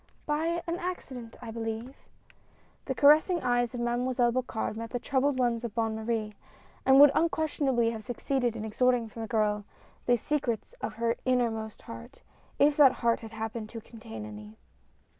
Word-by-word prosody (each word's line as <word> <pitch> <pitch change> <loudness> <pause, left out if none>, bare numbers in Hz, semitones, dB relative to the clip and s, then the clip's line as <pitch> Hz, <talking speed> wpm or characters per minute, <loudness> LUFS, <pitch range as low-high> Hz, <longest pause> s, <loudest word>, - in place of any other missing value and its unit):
" - - -35
By 330 +3 0
an 340 +1 -2
accident 260 -10 -6
I 225 - -6
believe? 225 +3 -5 0.5
" - - -34
The 265 - -2
caressing 305 +7 +5
eyes 245 0 +1
of 240 - -3
Mademoiselle 240 0 +1
Bocard 240 -3 -2
met 230 +1 -5
the 245 - -2
troubled 270 +2 +1
ones 240 -2 +1
of 230 -3 -5
Bonne 225 -1 0
Marie, 220 -1 -2 0.5
and 265 0 +7
would 290 -1 +9
unquestion 315 -2 0
ably 235 -3 +2
have 220 -2 -6
succeeded 245 0 -1
in 220 -1 -4
extorting 240 +1 +1
from 225 - -8
the 225 - -4
girl 210 -2 +1 0.4
the 245 0 +5
secrets 265 - -2
of 220 - -4
her 230 +1 0
innermost 230 -4 -1
heart, 235 +3 -11 0.3
if 290 0 +4
that 275 -4 +7
heart 230 -1 +3
had 225 -1 -10
hap 220 0 -4
pened 225 -2 -5
to 230 - -7
contain 160 - -9
any. 105 0 -10
240 Hz, 180 wpm, -29 LUFS, 225-265 Hz, 0.5 s, would